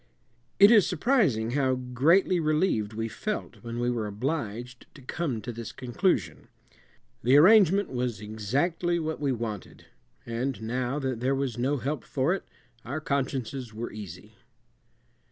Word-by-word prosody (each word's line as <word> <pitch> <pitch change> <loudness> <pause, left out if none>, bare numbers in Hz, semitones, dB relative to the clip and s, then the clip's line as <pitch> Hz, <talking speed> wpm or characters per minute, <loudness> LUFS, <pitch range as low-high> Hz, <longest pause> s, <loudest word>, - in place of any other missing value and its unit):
It 200 +2 +8
is 215 -5 +6
surprising 160 - +1
how 130 -1 +1
greatly 140 +9 +2
relieved 155 - +1
we 115 +1 -2
felt 215 - -4
when 115 0 -6
we 120 0 +1
were 115 -3 -2
obliged 120 +1 -4
to 145 - -13
come 130 -4 -3
to 120 +4 -5
this 115 0 -7
conclusion. 180 +10 -1 0.7
The 130 +5 +5
arrangement 200 +3 +6
was 125 -4 -2
exactly 135 - -1
what 160 -1 -3
we 145 -2 0
wanted, 110 -5 -5 0.4
and 120 +3 -3
now 125 +4 -2
that 130 -5 -2
there 130 +3 +1
was 135 -3 -2
no 135 +4 +1
help 140 +4 -3
for 140 +5 0
it 195 - -5 0.4
our 140 +6 -4
consciences 130 -5 -3
were 115 +2 -5
easy. 105 0 -9
130 Hz, 145 wpm, -27 LUFS, 115-155 Hz, 0.7 s, It